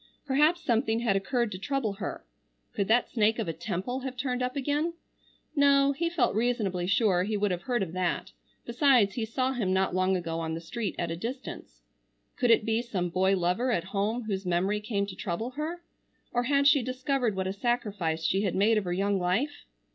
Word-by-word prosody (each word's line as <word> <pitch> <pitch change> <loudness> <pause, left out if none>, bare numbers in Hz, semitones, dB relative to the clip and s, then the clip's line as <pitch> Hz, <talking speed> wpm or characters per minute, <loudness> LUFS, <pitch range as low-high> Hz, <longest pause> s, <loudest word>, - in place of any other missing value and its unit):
Perhaps 300 +5 +3
something 230 -3 +1
had 225 -5 +2
occurred 235 +3 0
to 185 - -5
trouble 260 -2 -1
her. 200 - -6 0.5
Could 200 - -1
that 235 +2 +3
snake 220 -1 +2
of 225 -5 -2
a 165 - -2
Temple 190 +9 -3
have 260 -1 -6
turned 250 -1 -2
up 250 0 -1
again? 290 +4 0 0.6
No, 280 -1 +5
he 335 +5 -1
felt 310 -9 +1
reasonably 210 -6 0
sure 195 -2 +3
he 210 +3 -1
would 205 -1 +1
have 180 -1 -2
heard 240 0 0
of 170 -3 -6
that, 180 -1 -1 0.3
besides 235 -5 +4
he 230 - -2
saw 255 +4 -1
him 205 -7 0
not 190 -1 +1
long 185 +1 +2
ago 165 -2 -3
on 160 -1 -3
the - - -4
street 205 +5 -4
at 170 -1 -2
a - - -2
distance. 225 - -7 0.5
Could 245 - +1
it 225 -2 +5
be 225 +1 +1
some 195 -7 -2
boy 190 +2 +2
lover 180 +9 +1
at 170 -8 0
home 215 +4 0
whose 200 -3 -3
memory 185 +3 0
came 210 -2 -1
to 195 -2 -8
trouble 215 +4 -3
her? 320 +5 -5 0.5
Or 245 - +1
had 280 +2 +2
she 285 -1 +6
discovered 255 -2 -1
what 190 0 -1
a 190 - -2
sacrifice 200 -8 -1
she 195 +4 +2
had 200 -4 -1
made 215 +3 +4
of 200 - -6
her 175 - -1
young 195 +1 +1
life? 195 +12 -1
220 Hz, 210 wpm, -28 LUFS, 190-255 Hz, 0.6 s, she